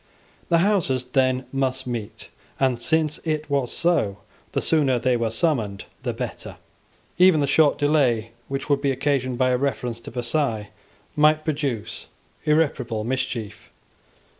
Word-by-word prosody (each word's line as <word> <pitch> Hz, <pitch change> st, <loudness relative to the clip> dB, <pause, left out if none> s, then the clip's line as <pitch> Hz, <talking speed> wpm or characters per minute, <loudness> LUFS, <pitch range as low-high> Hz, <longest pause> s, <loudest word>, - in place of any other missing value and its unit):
The 170 Hz, -, +4 dB
Houses 150 Hz, -, +1 dB
then 130 Hz, 0 st, +1 dB
must 130 Hz, -1 st, -1 dB
meet; 120 Hz, -4 st, -6 dB, 0.3 s
and 130 Hz, -3 st, +1 dB
since 155 Hz, 0 st, +1 dB
it 155 Hz, -1 st, -2 dB
was 135 Hz, -4 st, 0 dB
so, 150 Hz, -, +1 dB, 0.4 s
the -, -, +1 dB
sooner 140 Hz, -6 st, +3 dB
they 125 Hz, +1 st, +1 dB
were 115 Hz, -1 st, 0 dB
summoned 115 Hz, -6 st, -1 dB, 0.2 s
the -, -, -2 dB
better. -, -, -6 dB, 0.6 s
Even 180 Hz, -3 st, +6 dB
the 145 Hz, -, +2 dB
short 145 Hz, +1 st, +3 dB
delay 130 Hz, -7 st, +2 dB, 0.2 s
which 135 Hz, 0 st, -4 dB
would 140 Hz, -1 st, +2 dB
be 140 Hz, -, +1 dB
occasioned 130 Hz, -2 st, 0 dB
by 130 Hz, 0 st, +2 dB
a 125 Hz, -, +2 dB
reference 125 Hz, -4 st, -2 dB
to -, -, -9 dB
Versailles 120 Hz, -3 st, -1 dB, 0.4 s
might 155 Hz, +1 st, +4 dB
produce 140 Hz, -8 st, -3 dB, 0.4 s
irreparable 140 Hz, -8 st, +1 dB
mischief. 115 Hz, -4 st, -4 dB
135 Hz, 140 wpm, -23 LUFS, 120-150 Hz, 0.6 s, Even